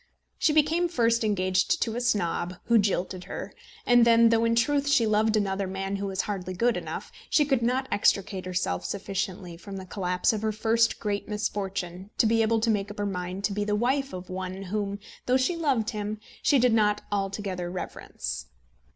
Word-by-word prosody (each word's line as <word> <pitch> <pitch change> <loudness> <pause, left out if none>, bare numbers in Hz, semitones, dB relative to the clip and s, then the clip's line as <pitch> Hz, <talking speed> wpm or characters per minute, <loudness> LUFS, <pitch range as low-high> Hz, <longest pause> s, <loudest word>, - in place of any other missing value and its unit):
She - - +3
became 315 +3 +3
first 230 -6 +2
engaged 185 -3 +1
to 225 - -3
a 240 - -2
snob, 180 -6 0
who 235 -1 +4
jilted 185 -2 -1
her; - - -6 0.3
and 245 -1 +6
then, 230 0 +6
though 230 0 +3
in 230 0 +2
truth 285 +4 +2
she 265 -5 +4
loved 215 0 +2
another 195 -1 0
man 195 +1 -3
who 200 0 -3
was 195 0 -1
hardly 185 -3 -4
good 235 +5 +2
enough, - - -5 0.2
she 300 - +4
could 270 -4 +1
not 255 +3 0
extricate 195 -2 +1
herself 180 - -1
sufficiently 190 -3 -4
from 195 +3 -8
the 190 - -7
collapse 180 +1 0
of 215 - -2
her 220 0 0
first 225 +2 +2
great 205 -1 -3
misfortune 195 -3 -3
to - - +4
be 225 +1 +3
able 225 0 +2
to 225 0 +2
make 205 -1 -1
up 205 - -9
her 205 - -1
mind 185 0 -4
to 200 - 0
be 205 +1 -1
the 210 0 0
wife 270 +5 0
of 180 0 -7
one 185 +1 -5
whom, 200 +1 -2 0.3
though 250 +1 +4
she 260 +7 +1
loved 265 -9 0
him, 210 -1 -3 0.2
she 285 - +4
did 250 -2 +4
not 210 -2 +2
altogether 195 -3 -2
reverence. 60 - -5
210 Hz, 195 wpm, -27 LUFS, 190-230 Hz, 0.3 s, and